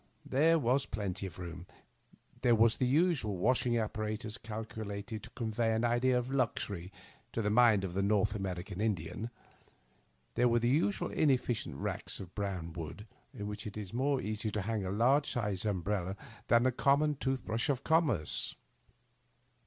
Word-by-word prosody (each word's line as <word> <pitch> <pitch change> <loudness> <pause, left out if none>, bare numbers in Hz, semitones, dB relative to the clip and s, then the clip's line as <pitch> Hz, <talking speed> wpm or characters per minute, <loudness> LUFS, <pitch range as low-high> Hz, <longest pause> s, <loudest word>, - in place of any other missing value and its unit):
There 160 +5 +4
was 130 -1 +1
plenty 100 -2 -3
of 90 - -11
room; 90 0 -7 0.7
there 120 -2 +5
was 115 +1 +4
the 130 - +1
usual 140 - +2
washing 125 +4 +2
apparatus, 110 0 -3
calculated 110 -1 -5
to - - -11
convey 115 -1 0
an 115 +2 +1
idea 120 +2 +3
of 125 +1 -2
luxury 100 -8 -1 0.4
to 115 - 0
the 105 - +1
mind 110 -3 +5
of 90 -2 -4
a 100 - +1
Korth 100 0 +2
American 95 -1 -4
Indian; 105 +1 -2 1.0
there 125 +1 +3
were 120 0 +3
the 120 0 +1
usual 160 +9 +1
inefficient 130 -6 +1
racks - - -3
of 95 -2 -9
brown 95 -5 -3
wood, 85 +5 -6 0.3
in 105 - -6
which 105 +1 -5
it 105 - -7
is 105 -2 -6
more 135 +3 +1
easy 110 0 -2
to 105 -2 -2
hang 110 0 -1
a 95 - -2
large 130 +8 +3
sized 105 -4 -1
umbrella 95 -1 -1 0.3
than 120 0 +5
the 130 - +3
common 140 +4 +3
tooth 130 -1 -1
brush 115 +4 -1
of 135 -1 0
conmierce. 160 - +1
110 Hz, 165 wpm, -33 LUFS, 100-125 Hz, 1.0 s, there